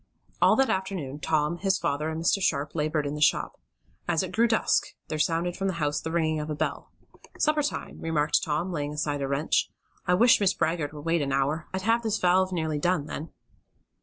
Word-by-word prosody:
All -, -, +6 dB
that 270 Hz, 0 st, +3 dB
afternoon 185 Hz, -8 st, -3 dB
Tom, 155 Hz, +2 st, 0 dB
his 195 Hz, -1 st, +1 dB
father 150 Hz, +2 st, -1 dB
and 160 Hz, 0 st, -4 dB
Mr. 195 Hz, +3 st, +2 dB
Sharp 145 Hz, -4 st, 0 dB
labored 155 Hz, -1 st, 0 dB
in 140 Hz, -, -2 dB
the 150 Hz, -, -5 dB
shop. 150 Hz, -, +2 dB, 0.5 s
As 175 Hz, +1 st, +1 dB
it 185 Hz, -, -5 dB
grew 230 Hz, +2 st, +3 dB
dusk 220 Hz, -1 st, +2 dB, 0.2 s
there 155 Hz, -, -3 dB
sounded 170 Hz, +3 st, 0 dB
from 195 Hz, -, -2 dB
the 190 Hz, -, -1 dB
house 150 Hz, -2 st, -1 dB
the 160 Hz, -, -4 dB
ringing 160 Hz, -2 st, 0 dB
of 150 Hz, +1 st, -5 dB
a 150 Hz, -, -2 dB
bell. 155 Hz, +1 st, -3 dB, 0.5 s
"Supper 305 Hz, -1 st, +2 dB
time," 290 Hz, -, -4 dB
remarked 155 Hz, -2 st, +1 dB
Tom, 160 Hz, +4 st, -1 dB
laying 145 Hz, -3 st, -3 dB
aside 145 Hz, -1 st, -2 dB
a 135 Hz, -, -1 dB
wrench. 140 Hz, +3 st, +1 dB, 0.4 s
"I 180 Hz, -, +4 dB
wish 240 Hz, +6 st, +5 dB
Mrs. 195 Hz, -2 st, +2 dB
Baggert 160 Hz, -2 st, 0 dB
would 150 Hz, 0 st, -10 dB
wait 165 Hz, 0 st, +2 dB
about 140 Hz, -1 st, 0 dB
an -, -, +2 dB
hour. 155 Hz, +4 st, -3 dB
I'd 190 Hz, 0 st, -3 dB
have 230 Hz, +3 st, +2 dB
this 220 Hz, -2 st, 0 dB
valve 185 Hz, 0 st, +3 dB
nearly 160 Hz, -4 st, -1 dB
done, 175 Hz, -2 st, +1 dB
then." 155 Hz, +1 st, -6 dB
160 Hz, 220 wpm, -27 LUFS, 150-185 Hz, 0.5 s, All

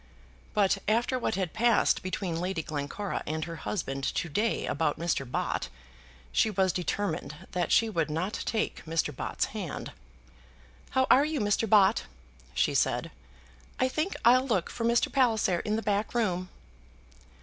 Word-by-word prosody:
But 200 Hz, -1 st, +3 dB
after 240 Hz, +4 st, +2 dB
what 225 Hz, -, -1 dB
had 185 Hz, -4 st, -2 dB
passed 230 Hz, +1 st, +3 dB
between 185 Hz, -2 st, -3 dB
Lady 180 Hz, -2 st, -2 dB
Glencora 155 Hz, +8 st, -3 dB
and 155 Hz, +1 st, -2 dB
her 165 Hz, 0 st, -7 dB
husband 135 Hz, -9 st, -3 dB
to 170 Hz, -, -1 dB
day 210 Hz, +9 st, 0 dB
about 150 Hz, 0 st, 0 dB
Mr. 160 Hz, -6 st, -1 dB
Bott, -, -, -2 dB, 0.6 s
she 220 Hz, -, +3 dB
was 190 Hz, -3 st, +1 dB
determined 180 Hz, -3 st, -2 dB, 0.2 s
that 180 Hz, -1 st, -1 dB
she 225 Hz, -, +5 dB
would 165 Hz, -8 st, -1 dB
not 175 Hz, +7 st, -2 dB
take 220 Hz, -1 st, -2 dB
Mr. 160 Hz, -3 st, -1 dB
Bott's -, -, -1 dB
hand. -, -, -5 dB, 1.0 s
"How 260 Hz, 0 st, +2 dB
are 275 Hz, -, +7 dB
you, 305 Hz, -1 st, -1 dB
Mr. 205 Hz, +1 st, +1 dB
Bott?" 205 Hz, 0 st, +5 dB, 0.5 s
she -, -, +2 dB
said. -, -, +1 dB, 0.7 s
"I 255 Hz, -, +3 dB
think 310 Hz, +8 st, -2 dB
I'll 255 Hz, +3 st, +6 dB
look 195 Hz, -9 st, 0 dB
for 230 Hz, -, -3 dB
Mr. 235 Hz, 0 st, +2 dB
Palliser 220 Hz, -9 st, +3 dB
in 210 Hz, +4 st, -1 dB
the 225 Hz, -, -2 dB
back 210 Hz, +2 st, -1 dB
room." 185 Hz, -6 st, 0 dB
200 Hz, 155 wpm, -29 LUFS, 165-230 Hz, 1.0 s, are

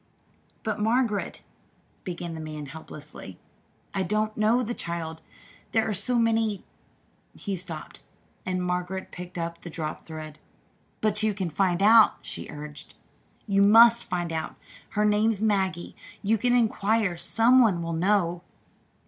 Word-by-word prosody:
"But, 215 Hz, -1 st, -2 dB
Margaret," 225 Hz, -1 st, 0 dB, 0.6 s
began 175 Hz, -2 st, -5 dB
the 160 Hz, -, -6 dB
man 155 Hz, -1 st, -6 dB
helplessly, 150 Hz, -, -10 dB, 0.6 s
"I 195 Hz, -, -1 dB
don't 215 Hz, +2 st, -1 dB
know 220 Hz, +4 st, +2 dB
the 240 Hz, +1 st, -3 dB
child 165 Hz, -5 st, -5 dB, 0.5 s
there 225 Hz, -1 st, +2 dB
are 215 Hz, -, -1 dB
so 210 Hz, +6 st, +1 dB
many 225 Hz, -3 st, +1 dB, 0.4 s
" -, -, -39 dB, 0.3 s
he 200 Hz, -2 st, -4 dB
stopped, 170 Hz, -3 st, -7 dB, 0.4 s
and 185 Hz, -1 st, -2 dB
Margaret 180 Hz, +1 st, -3 dB
picked 180 Hz, 0 st, -9 dB
up 170 Hz, 0 st, -4 dB
the 175 Hz, -, -8 dB
dropped 155 Hz, -2 st, -5 dB
thread. 155 Hz, -1 st, -8 dB, 0.6 s
"But 210 Hz, -1 st, +1 dB
you 215 Hz, -2 st, +1 dB
can 185 Hz, -4 st, -3 dB
find 185 Hz, +2 st, +1 dB
out," 220 Hz, +1 st, +7 dB
she -, -, -6 dB
urged. 150 Hz, 0 st, -8 dB, 0.5 s
"You 200 Hz, -2 st, +2 dB
must 230 Hz, +3 st, +7 dB
find 175 Hz, -2 st, -3 dB
out. 160 Hz, 0 st, -3 dB, 0.3 s
Her 210 Hz, 0 st, 0 dB
name's 210 Hz, 0 st, +2 dB
Maggie. 190 Hz, -5 st, 0 dB, 0.3 s
You 215 Hz, +2 st, +2 dB
can 245 Hz, +2 st, +2 dB
inquire 220 Hz, -4 st, +1 dB
some 225 Hz, +10 st, +4 dB
one 190 Hz, -8 st, +2 dB
will 165 Hz, 0 st, -3 dB
know." 175 Hz, 0 st, +1 dB
190 Hz, 145 wpm, -26 LUFS, 170-220 Hz, 0.6 s, out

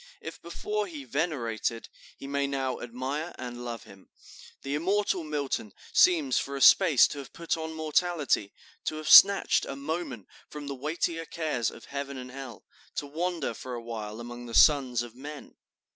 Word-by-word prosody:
If -, -, -9 dB
before 210 Hz, +4 st, -3 dB
he 155 Hz, -6 st, -8 dB
venerated, 120 Hz, -6 st, -2 dB, 0.3 s
he -, -, -10 dB
may 140 Hz, 0 st, -1 dB
now 135 Hz, -2 st, -2 dB
admire 130 Hz, +7 st, -4 dB
and 120 Hz, -1 st, -7 dB
love 120 Hz, -2 st, -6 dB
him. 95 Hz, -1 st, -16 dB, 0.5 s
The 135 Hz, -, -3 dB
immortal 185 Hz, +3 st, 0 dB
Milton 140 Hz, -9 st, -3 dB, 0.2 s
seems 155 Hz, -8 st, +4 dB
for 140 Hz, -, -4 dB
a 135 Hz, -, -4 dB
space 160 Hz, -6 st, +7 dB
to 145 Hz, -, -6 dB
have 135 Hz, -, -10 dB
put 170 Hz, 0 st, -2 dB
on 160 Hz, 0 st, -5 dB
mortality, 155 Hz, -, 0 dB, 0.3 s
to -, -, -1 dB
have 155 Hz, 0 st, -6 dB
snatched 200 Hz, 0 st, +8 dB
a 135 Hz, -, -5 dB
moment 140 Hz, -, -4 dB, 0.2 s
from 150 Hz, -1 st, -8 dB
the 140 Hz, -, -4 dB
weightier 165 Hz, +4 st, -2 dB
cares 150 Hz, -8 st, -1 dB
of -, -, -13 dB
Heaven 140 Hz, -1 st, -5 dB
and 125 Hz, 0 st, -8 dB
Hell, 130 Hz, -4 st, -9 dB, 0.3 s
to -, -, -2 dB
wander 165 Hz, -1 st, -2 dB
for 125 Hz, +2 st, -7 dB
a 120 Hz, -, -7 dB
while 110 Hz, -2 st, -6 dB
among 120 Hz, +1 st, -8 dB
the 115 Hz, -, -6 dB
sons 130 Hz, -6 st, +5 dB
of 120 Hz, -2 st, -10 dB
men.... 145 Hz, +3 st, -9 dB
140 Hz, 175 wpm, -28 LUFS, 120-160 Hz, 0.5 s, snatched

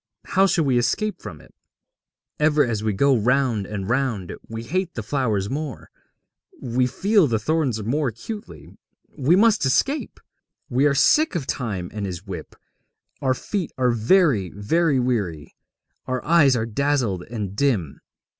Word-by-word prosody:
How 195 Hz, 0 st, +3 dB
shall 170 Hz, -4 st, +1 dB
we 130 Hz, -3 st, +3 dB
escape 215 Hz, -, -1 dB
from -, -, -9 dB
it? -, -, -20 dB, 0.9 s
Ever 150 Hz, 0 st, +3 dB
as 110 Hz, -3 st, -2 dB
we 110 Hz, -, +1 dB
go 135 Hz, +7 st, +3 dB
round 120 Hz, -2 st, +1 dB
and 100 Hz, -3 st, -5 dB
round 120 Hz, -6 st, -1 dB, 0.2 s
we 115 Hz, 0 st, -6 dB
hate 180 Hz, +6 st, -2 dB
the 110 Hz, -, -4 dB
flowers 110 Hz, -5 st, -1 dB
more, 140 Hz, 0 st, -5 dB, 0.7 s
we 125 Hz, +1 st, 0 dB
feel 195 Hz, -, +2 dB
the 115 Hz, -3 st, 0 dB
thorns 130 Hz, -2 st, -1 dB
more 140 Hz, +7 st, 0 dB
acutely. 205 Hz, -, -8 dB, 0.4 s
We 145 Hz, +4 st, +3 dB
must 215 Hz, -1 st, +4 dB
escape! 270 Hz, -, 0 dB, 0.5 s
We 130 Hz, +4 st, +3 dB
are 140 Hz, -, +1 dB
sick 305 Hz, -, +3 dB
of 155 Hz, -6 st, -2 dB
Time 100 Hz, -10 st, -4 dB
and 105 Hz, -2 st, -3 dB
his 90 Hz, +1 st, -7 dB
whip, 95 Hz, -3 st, -8 dB, 0.7 s
our 130 Hz, -1 st, +1 dB
feet 190 Hz, +4 st, -4 dB
are 125 Hz, -1 st, +2 dB
very, 115 Hz, -, +3 dB
very 140 Hz, +8 st, +1 dB
weary, 100 Hz, -12 st, -2 dB, 0.5 s
our 130 Hz, -1 st, -3 dB
eyes 150 Hz, -5 st, +5 dB
are 110 Hz, -2 st, -1 dB
dazzled 120 Hz, -5 st, 0 dB
and 105 Hz, -5 st, -5 dB
dim. 105 Hz, -, 0 dB
130 Hz, 155 wpm, -23 LUFS, 110-150 Hz, 0.9 s, eyes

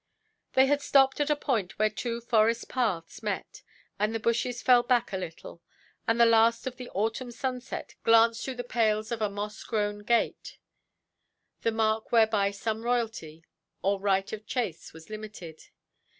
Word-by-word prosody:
They 265 Hz, -, +6 dB
had 290 Hz, +1 st, +1 dB
stopped 270 Hz, -1 st, +4 dB
at 290 Hz, -, +1 dB
a 300 Hz, -, +3 dB
point 225 Hz, -11 st, -2 dB
where 215 Hz, 0 st, +2 dB
two 235 Hz, -1 st, -4 dB
forest–paths 225 Hz, -4 st, 0 dB
met, -, -, -4 dB, 0.4 s
and 210 Hz, +2 st, 0 dB
the -, -, -1 dB
bushes 235 Hz, +2 st, -1 dB
fell 250 Hz, -1 st, +6 dB
back 240 Hz, -5 st, +1 dB
a -, -, 0 dB
little, 170 Hz, -2 st, -7 dB, 0.5 s
and 225 Hz, +1 st, +2 dB
the 235 Hz, -, +8 dB
last 230 Hz, 0 st, +4 dB
of 255 Hz, -1 st, -5 dB
the 250 Hz, -1 st, -8 dB
autumn 225 Hz, +5 st, -2 dB
sunset 250 Hz, +1 st, -5 dB
glanced 230 Hz, 0 st, +4 dB
through 265 Hz, -, -4 dB
the 245 Hz, -, -4 dB
pales 220 Hz, -2 st, 0 dB
of 230 Hz, -2 st, -3 dB
a 210 Hz, -, +1 dB
moss–grown 205 Hz, +1 st, -3 dB
gate, 230 Hz, +3 st, -1 dB, 1.0 s
the 230 Hz, -, +1 dB
mark 220 Hz, 0 st, 0 dB
whereby 220 Hz, -3 st, +4 dB
some 215 Hz, +2 st, -3 dB
royalty, 225 Hz, -10 st, -2 dB, 0.4 s
or 195 Hz, 0 st, +1 dB
right 195 Hz, 0 st, 0 dB
of 215 Hz, 0 st, -7 dB
chase, 230 Hz, -11 st, -3 dB
was 160 Hz, +5 st, -14 dB
limited. 210 Hz, -7 st, -9 dB
225 Hz, 160 wpm, -28 LUFS, 205-240 Hz, 1.0 s, the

